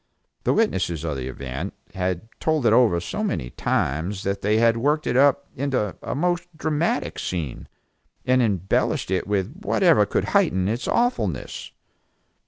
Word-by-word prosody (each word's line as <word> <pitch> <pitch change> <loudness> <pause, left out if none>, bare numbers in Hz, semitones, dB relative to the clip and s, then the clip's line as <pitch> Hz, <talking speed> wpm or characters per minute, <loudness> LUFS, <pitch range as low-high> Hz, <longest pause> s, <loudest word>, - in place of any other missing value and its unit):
The - - +3
witnesses 90 - 0
of 80 -3 -2
the 65 -1 -4
event 70 +7 -5 0.2
had 90 +2 -2
told 155 -5 +1
it - - +5
over 110 -9 +4
so 150 - -4
many 75 - -2
times 85 +8 -1
that 100 0 -2
they 105 +2 +2
had 115 0 +4
worked 150 +5 +1
it - - 0
up 140 +1 +4
into 125 -7 -1
a - - -4
most 175 +3 0
dramatic 155 +1 -1
scene, 80 -8 -4 0.6
and 130 0 +4
embellished 95 -4 0
it 95 - 0
with 100 +3 -1
whatever 165 - +4
could - - -1
heighten 95 0 +3
its 115 +4 -2
awfulness. 245 +1 -1
105 Hz, 155 wpm, -23 LUFS, 90-145 Hz, 0.6 s, it